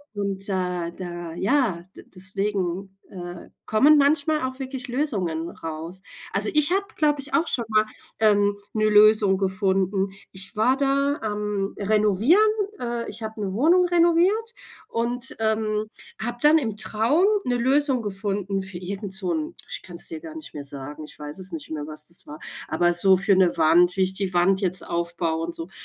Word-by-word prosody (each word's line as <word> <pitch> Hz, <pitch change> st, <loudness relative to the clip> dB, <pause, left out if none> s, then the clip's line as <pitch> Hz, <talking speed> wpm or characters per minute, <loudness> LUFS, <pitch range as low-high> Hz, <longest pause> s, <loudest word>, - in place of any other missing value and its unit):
Und, 200 Hz, -1 st, -3 dB
da 180 Hz, -2 st, -2 dB
da 175 Hz, -2 st, -7 dB
ja, 195 Hz, -3 st, +1 dB
d -, -, -11 dB
deswegen, 190 Hz, 0 st, -3 dB
äh, 175 Hz, -2 st, -8 dB, 0.2 s
kommen 290 Hz, +8 st, +5 dB
manchmal 295 Hz, +1 st, +2 dB
auch 260 Hz, +1 st, -4 dB
wirklich 265 Hz, -1 st, -5 dB
Lösungen 190 Hz, -, -2 dB
raus. 165 Hz, +3 st, -7 dB, 0.3 s
Also 200 Hz, +2 st, +4 dB
ich 300 Hz, +2 st, +3 dB
habe, 395 Hz, +1 st, +1 dB
glaube 295 Hz, -2 st, +2 dB
ich 290 Hz, +4 st, -7 dB
auch 335 Hz, +1 st, +2 dB
schon 235 Hz, -, -1 dB
mal, 215 Hz, 0 st, +3 dB, 0.3 s
ähm, 205 Hz, -2 st, +3 dB, 0.2 s
‘ne 215 Hz, -1 st, +1 dB
Lösung 210 Hz, -2 st, +6 dB
gefunden. 190 Hz, 0 st, +1 dB, 0.2 s
Ich 190 Hz, +4 st, -5 dB
war 245 Hz, +5 st, +3 dB
da 275 Hz, +1 st, +1 dB
am 210 Hz, -2 st, -2 dB
Renovieren, 215 Hz, -, +4 dB, 0.3 s
äh 235 Hz, -1 st, -3 dB
ich 220 Hz, +2 st, -7 dB
habe 220 Hz, 0 st, -6 dB
‘ne 195 Hz, -2 st, -2 dB
Wohnung 335 Hz, -, +4 dB
renoviert 350 Hz, +7 st, +3 dB, 0.3 s
und, 240 Hz, +2 st, -3 dB
ähm, 215 Hz, -1 st, 0 dB, 0.4 s
habe 240 Hz, +2 st, -3 dB
dann 305 Hz, +2 st, +6 dB
im 220 Hz, -6 st, -3 dB
Traum 230 Hz, -, +2 dB, 0.2 s
‘ne 245 Hz, -, +1 dB
Lösung 265 Hz, 0 st, +2 dB
gefunden 195 Hz, -1 st, -2 dB
für 190 Hz, -2 st, -8 dB
irgend 195 Hz, +2 st, -5 dB
so 185 Hz, -3 st, -1 dB
‘n 155 Hz, -1 st, -3 dB
ich -, -, -5 dB
kann 175 Hz, -2 st, -10 dB
‘s -, -, -7 dB
dir 330 Hz, -, -6 dB
gar 320 Hz, -1 st, -10 dB
nicht 315 Hz, -, -9 dB
mehr 145 Hz, -2 st, -7 dB
sagen, 145 Hz, +2 st, -6 dB
ich -, -, -12 dB
weiß 150 Hz, +3 st, -8 dB
es 185 Hz, 0 st, -7 dB
nicht 160 Hz, -1 st, -7 dB
mehr, 150 Hz, -1 st, -4 dB
was 155 Hz, 0 st, -7 dB
es 170 Hz, -, -4 dB
war. 150 Hz, +1 st, -9 dB, 0.3 s
Aber 175 Hz, +2 st, +2 dB
so 190 Hz, +2 st, +5 dB
für 195 Hz, +1 st, +3 dB
‘ne 185 Hz, -2 st, +3 dB
Wand 175 Hz, +4 st, +4 dB
wie -, -, +2 dB
ich 185 Hz, 0 st, -1 dB
die 190 Hz, -1 st, -3 dB
Wand 190 Hz, +3 st, +3 dB
jetzt 185 Hz, -1 st, 0 dB
aufbaue 170 Hz, -1 st, -2 dB
und 170 Hz, -, -4 dB
so. 165 Hz, +2 st, -7 dB
200 Hz, 180 wpm, -24 LUFS, 180-250 Hz, 0.4 s, Lösung